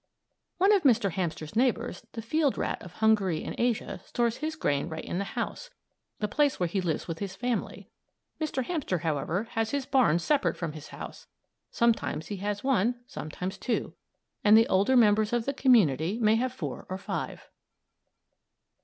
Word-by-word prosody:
One 390 +4 +5
of 400 - +4
Mr. 235 - +3
Hamster's 165 -1 -3
neighbors, 240 -1 0
the 225 - -5
field 290 +4 +1
rat - - -2
of 175 - -11
Hungary 205 -6 +2
and - - -4
Asia, 225 -6 -1
stores 235 +1 0
his 310 +2 -3
grain 145 - 0
right 160 0 -6
in 175 - -3
the 200 - -5
house - - -3 0.5
the 210 - -1
place 290 +6 +1
where 180 - +2
he 185 +3 -1
lives 165 -4 -2
with 165 -2 -4
his 195 -2 -4
family. 245 +4 -3 0.5
Mr. 300 -5 -1
Hamster, 290 - -1
however, 160 +4 -1
has 225 -1 0
his 280 0 -2
barns 225 - +3
separate 290 +5 +1
from 170 -3 -3
his 155 -1 -9
home. - - -7 0.6
Sometimes 220 -9 0
he 205 - -3
has 205 +1 -3
one, 245 -3 +2
sometimes 180 +1 -6
two; 245 - -2 0.5
and 210 +1 +7
the 225 - +5
older 200 +7 +4
members 215 -1 +4
of 240 -1 +1
the 280 - -1
community 200 - +3
may 215 -2 +4
have 250 +3 +1
four 150 - -6
or 185 - -3
five. 195 - -5
215 Hz, 175 wpm, -28 LUFS, 180-250 Hz, 0.6 s, and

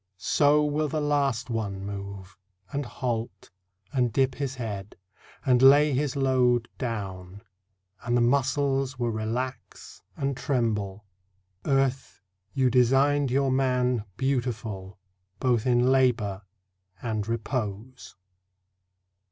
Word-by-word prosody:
So 150 +8 +3
will 150 +1 0
the 155 +1 -2
last 140 -5 0
one 100 -4 -3
move, 100 -1 -7 0.4
And 140 -2 -3
halt, 115 -7 -4 0.4
and 125 -3 +1
dip 130 +2 +2
his 135 -1 -4
head, 105 -5 -6 0.5
and 125 -2 +4
lay 145 +2 +7
his 140 +1 0
load 125 -3 +2
Down, 100 -4 -5 0.6
and 120 0 0
the - - +3
muscles 135 +1 +1
will 120 -1 -1
relax 115 +4 -5 0.2
and 140 -1 -1
tremble... 105 -7 -1 0.6
Earth, 135 -2 0 0.3
you 130 -3 +2
designed 135 +3 +3
your 135 +1 +1
man 125 -3 +1
Beautiful 110 -8 -2 0.4
both 125 -2 +1
in 125 +1 +3
labour, 120 -7 +2 0.6
and 110 -3 -2
repose. 115 0 -4
125 Hz, 110 wpm, -26 LUFS, 110-135 Hz, 0.6 s, lay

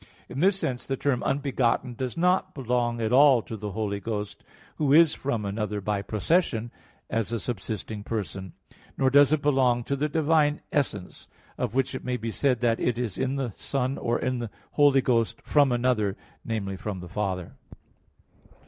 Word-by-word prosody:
In 130 - -6
this 190 +4 +4
sense 125 -9 -2
the 135 - -1
term 135 -3 0
"unbegotten" 135 -3 0
does 125 +4 -4
not 180 +2 +1
belong 120 -2 0
at 115 +1 0
all 135 -3 +6
to 115 - -7
the 105 -2 -6
Holy 100 -1 -2
Ghost, 105 0 -5 0.3
Who 145 -3 +1
is 160 +1 +6
from 120 -7 -2
another 105 +1 -2
by 100 0 -1
procession, 115 - 0 0.4
as 115 -1 -2
a 115 - -1
subsisting 110 -1 -5
person; 95 -5 -4 0.4
nor 130 -1 +2
does 145 +1 +6
it 155 -2 +1
belong 130 -4 +3
to 140 - -1
the 150 +2 -1
divine 155 -1 +2
essence, 105 -10 -2 0.3
of 125 -2 -3
which 135 -1 +1
it - - -5
may 125 -1 -1
be 115 -1 -4
said 125 -1 +1
that 115 -2 +2
it 120 -2 0
is 120 -6 -3
in 130 +1 0
the 130 -6 -3
Son 135 0 -2
or 120 0 0
in 130 -1 -1
the 120 -2 -4 0.2
Holy 145 -2 +5
Ghost 115 -3 +1
from 145 -3 +3
another 120 -5 +1 0.3
namely, 100 -4 -3
from 100 0 -5
the 90 - -8
Father. 95 -1 -3
120 Hz, 180 wpm, -26 LUFS, 110-140 Hz, 0.4 s, all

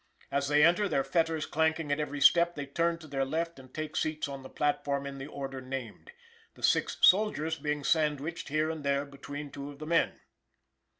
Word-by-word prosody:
As 140 0 0
they 150 +1 +4
enter, 180 +4 +3
their 135 - +1
fetters 165 -1 0
clanking 160 -1 0
at 145 - +1
every 145 -1 -3
step, 170 +4 +6
they 145 -1 -4
turn 170 +4 0
to 160 -1 -13
their 135 -2 -1
left 165 +3 -2
and 130 -1 -14
take 155 +2 -5
seats 155 -1 -1
on 140 -1 -7
the 130 - -10
platform 140 -1 -1
in 140 0 -6
the 135 - -6
order 135 -2 -6
named, 130 - -7 0.4
the - - -15
six - - +2
soldiers 165 -6 +4
being 150 0 -2
sandwiched 155 +1 0
here 155 +2 +1
and 160 -2 -6
there 140 0 +1
between 145 +1 -8
two 140 0 -7
of 145 - -11
the 155 - -7
men. 165 +1 +1
150 Hz, 200 wpm, -30 LUFS, 140-160 Hz, 0.4 s, step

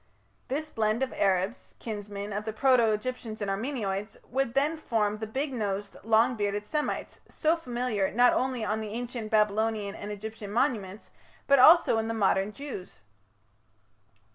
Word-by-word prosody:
"This 305 +4 -3
blend 220 +3 +1
of 265 - -3
Arabs, 190 +4 0
kinsmen 205 -2 -6
of 210 +1 -2
the 220 0 -4
proto 245 -1 +4
Egyptians 220 0 -4
and 205 -2 -2
Armenoids, 210 -2 -3
would 265 -1 -1
then 290 +4 +2
form 215 -8 -1
the 220 - -4
big 270 +5 -2
nosed, 205 -3 -3
long 225 +3 +4
bearded 205 -1 -2
Semites, 300 +6 -3
so 315 +2 +1
familiar 245 - -1
not 245 +2 +5
only 255 -3 0
on 215 +1 -1
the 215 - -5
ancient 235 0 -5
Babylonian 215 -1 +1
and 205 - -7
Egyptian 210 0 -7
monuments, 215 -5 -1 0.3
but 280 -1 +5
also 310 -4 +7
in 220 - -2
the 225 - -2
modern 195 -1 +2
Jews." 210 - -8
220 Hz, 155 wpm, -28 LUFS, 205-255 Hz, 0.3 s, also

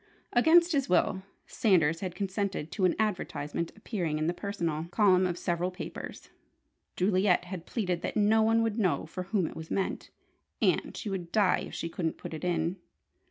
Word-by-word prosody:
Against 335 +7 +6
his 275 - +1
will, 185 +1 +2 0.2
Sanders 165 -7 +2
had 185 -2 -4
consented 195 -4 -2
to 190 - +1
an 180 - +3
advertisement 170 -6 -2
appearing 180 -8 -2
in 155 - -1
the 170 - +1
"personal" 170 -5 -3
column 185 -1 +4
of 175 -1 -3
several 175 0 -1
papers. 180 - -8 0.6
Juliet 185 -1 +2
had 180 -2 -7
pleaded 180 -7 -1
that - - -3
no 215 +1 +4
one 225 +1 +3
would 225 0 -1
know 185 -5 +1
for 180 +3 -6
whom 195 -1 +1
it - - -6
was 160 0 -8
meant, 195 - -2 0.5
and - - +1
she - - -5
should 180 -3 -4
die 205 -3 +3
if - - -9
she - - -3
couldn't 165 -1 -3
put - - -8
it 160 - -6
in! 170 0 0
185 Hz, 180 wpm, -29 LUFS, 170-210 Hz, 0.6 s, Against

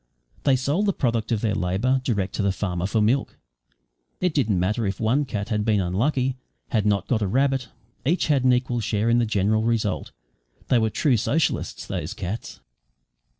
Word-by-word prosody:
They 135 -2 +5
sold 145 +11 0
the 200 - +2
product 115 -6 -1
of 110 -3 +1
their 110 -3 +1
labour 105 +9 +1
direct 100 -7 -1
to - - -1
the 100 -1 +2
farmer 90 -2 -2
for 110 +1 +1
milk. 130 +6 +1 0.8
It 180 -3 +1
didn't 110 - +1
matter 105 +4 0
if 95 - -3
one 125 +7 +2
cat 105 -4 -4
had 105 -2 0
been 105 -2 +2
unlucky 125 - 0 0.3
had 105 -2 +1
not 100 -1 +1
got 115 -4 +1
a 100 - +1
rabbit 135 +3 +1 0.4
each 165 +7 +1
had 140 -4 +2
an 130 - +5
equal 125 -1 +1
share 110 0 0
in 120 - +4
the 120 - +1
general 105 +1 +1
result. 110 -3 -1 0.6
They 125 - +4
were 110 -1 +2
true 130 +3 +2
socialists, 145 +7 -1
those 90 +9 -4
cats. 100 +3 -6
115 Hz, 190 wpm, -24 LUFS, 100-130 Hz, 0.8 s, They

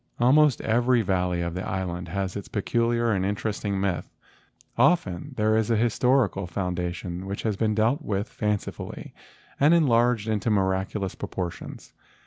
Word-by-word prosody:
Almost 140 +3 +4
every 120 +1 +2
valley 90 -2 0
of 85 -1 -3
the 90 +1 -4
island 90 -1 -3
has 95 +2 -3
its 100 - -6
peculiar 115 +2 0
and 95 -3 0
interesting 100 0 -2
myth. 95 -2 -2 0.6
Often 130 - +1
there 110 0 +2
is 110 0 +1
a 115 - +3
historical 115 -3 +2
foundation 90 0 -4
which 100 +1 -4
has 110 -3 0
been 110 +1 0
dealt 115 +8 +2
with 100 -5 -2
fancifully 105 -3 -4 0.5
and 150 +4 +5
enlarged 120 -7 +3
into 110 0 0
miraculous 95 -1 0
propor¬ 90 -2 -4
tions. - - -11
105 Hz, 145 wpm, -25 LUFS, 95-120 Hz, 0.6 s, and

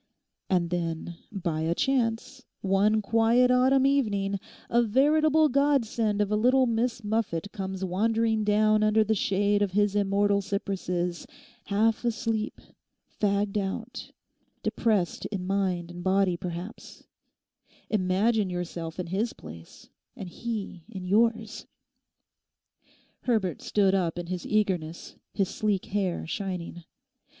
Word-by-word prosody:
And 175 -2 +1
then, 170 -1 -3 0.2
by 170 -6 -2
a 165 +1 0
chance, 260 +1 -1 0.2
one 205 +3 +2
quiet 230 +4 +3
autumn 260 +1 +4
evening, 200 -8 +1 0.3
a 235 - +3
veritable 305 +6 +4
godsend 240 -7 +1
of 205 - -5
a - - +3
little 255 +4 +4
Miss 230 0 -1
Muffet 205 -4 -2
comes 190 -1 -4
wandering 220 +4 +1
down 215 +1 +3
under 215 +1 +4
the 215 +1 +1
shade 205 0 +1
of 200 -3 0
his 205 0 +2
immortal 200 0 +2
cypresses, 180 -3 -3 0.4
half 215 +3 +1
asleep, 225 -2 -2 0.6
fagged 200 0 +1
out, 195 -1 -5 0.5
depressed 210 -7 0
in 195 -3 -4
mind 185 -3 -1
and 175 0 -8
body, 190 -1 +2
perhaps: 175 +4 -7 0.8
imagine 205 +1 +1
yourself 175 -1 -5
in 180 - -2
his 195 +7 -1
place, 80 +1 -12 0.3
and 190 - -7
he 210 -4 -5
in 190 -5 -7
yours!' 225 +2 +1 1.6
Herbert 210 - 0
stood 195 -2 +2
up 175 -4 0
in 175 - -4
his 180 0 -5
eagerness, 180 -6 -1 0.2
his 195 -2 0
sleek 205 -3 -1
hair 200 -4 -2
shining. 175 -2 -5
205 Hz, 125 wpm, -27 LUFS, 185-225 Hz, 1.6 s, autumn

